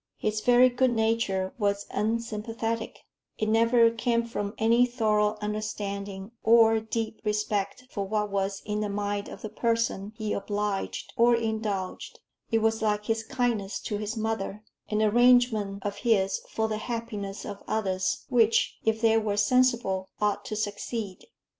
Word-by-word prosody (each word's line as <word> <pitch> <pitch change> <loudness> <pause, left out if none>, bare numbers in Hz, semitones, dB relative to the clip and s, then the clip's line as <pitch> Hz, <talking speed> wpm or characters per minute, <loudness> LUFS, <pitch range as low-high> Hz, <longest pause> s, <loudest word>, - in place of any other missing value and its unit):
His 215 0 -1
very 245 +2 +6
good 250 0 +1
nature 220 -4 0
was 200 -1 0
unsympathetic; 225 +1 -2 0.3
it 215 - -1
never 230 +1 +4
came 235 0 0
from 205 -3 -4
any 235 +2 +4
thorough 215 -3 +1
understanding 205 -1 -4
or 225 -1 +5
deep 220 0 -4
respect 210 +1 -1
for 200 - -2
what 210 0 -1
was 195 0 -2
in 210 0 -2
the 210 -1 -1
mind 205 0 -2
of - - -10
the 215 - -4
person 230 -2 -1
he 215 -2 -2
obliged 205 0 -3
or 235 +1 +5
indulged; 220 -4 -3 0.3
it 225 -2 +1
was 225 0 +1
like 210 -1 0
his 225 -1 0
kindness 230 -5 -1
to 210 - -3
his 215 +2 -4
mother 215 -2 -3 0.3
an 215 0 +1
arrangement 220 -3 +3
of 205 0 -2
his 195 -4 +2
for 220 0 -1
the 215 -1 -2
happiness 215 -4 -5
of 200 -1 -7
others, 190 -4 -1
which, 230 -2 +2
if 220 0 +1
they 225 -1 +4
were 210 -2 -1
sensible, 220 -4 +2
ought 210 -1 0
to 215 - -4
succeed. 205 -1 -4
215 Hz, 150 wpm, -27 LUFS, 205-230 Hz, 0.3 s, very